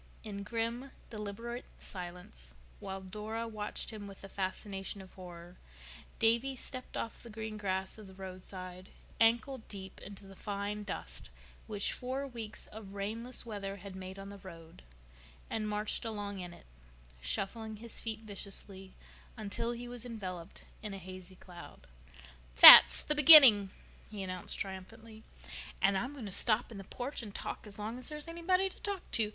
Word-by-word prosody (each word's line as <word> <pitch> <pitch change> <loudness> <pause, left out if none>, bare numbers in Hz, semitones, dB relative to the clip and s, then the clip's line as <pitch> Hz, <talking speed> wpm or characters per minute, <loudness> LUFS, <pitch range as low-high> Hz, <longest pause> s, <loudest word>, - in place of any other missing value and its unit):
In 200 -2 -6
grim, 230 +5 -3 0.2
deliberate 230 +3 -6
silence, 175 - -9 0.2
while 190 0 -6
Dora 215 +4 -5
watched 215 0 -4
him 210 -2 -8
with 195 -1 -12
the 195 - -10
fascination 195 +1 -4
of 190 -1 -13
horror, 175 -1 -11 0.6
Davy 235 +4 +2
stepped 255 0 -8
off 230 - -5
the 235 - -11
green 220 0 -6
grass 190 0 -3
of 210 - -11
the 190 - -14
roadside, 185 0 -7 0.3
ankle 235 +4 +3
deep 190 -2 -9
into 200 0 -10
the 195 0 -13
fine 205 +1 -4
dust 60 - -7 0.4
which 205 -2 0
four 260 +2 -3
weeks 230 -5 -5
of 205 -2 -11
rainless 225 +6 -3
weather 200 -3 -5
had 200 0 -10
made 190 0 -8
on 195 0 -8
the 200 0 -10
road, 165 -4 -12 0.7
and 215 -1 -2
marched 210 +3 -2
along 205 -3 -5
in 180 -1 -6
it, - - -15 0.6
shuffling 220 - -2
his 230 +2 -7
feet 220 -1 -4
viciously 195 -2 -7 0.4
until 220 +2 -3
he 240 0 -6
was 240 -1 -7
enveloped 190 -7 -7 0.2
in 210 -2 -6
a - - -6
hazy 185 0 -10
cloud. 175 - -13 0.7
"That's - - +12
the 300 - +2
beginning," 275 -10 +10 0.4
he 205 -2 -6
announced 185 -1 -4
triumphantly. 215 +4 -8 0.6
"And 195 0 +3
I'm 245 +8 -2
going 265 -6 -8
to 200 - -6
stop 225 +4 +1
in 210 - -8
the - - -8
porch 250 +7 -5
and 210 -3 -10
talk - - -5
as 200 - -8
long 220 +4 -5
as 255 - -4
there's 300 +1 -7
anybody 340 +3 +1
there 380 - -10
to - - -18
talk 405 -5 -5
to. 220 -2 +1
210 Hz, 165 wpm, -33 LUFS, 190-230 Hz, 0.7 s, That's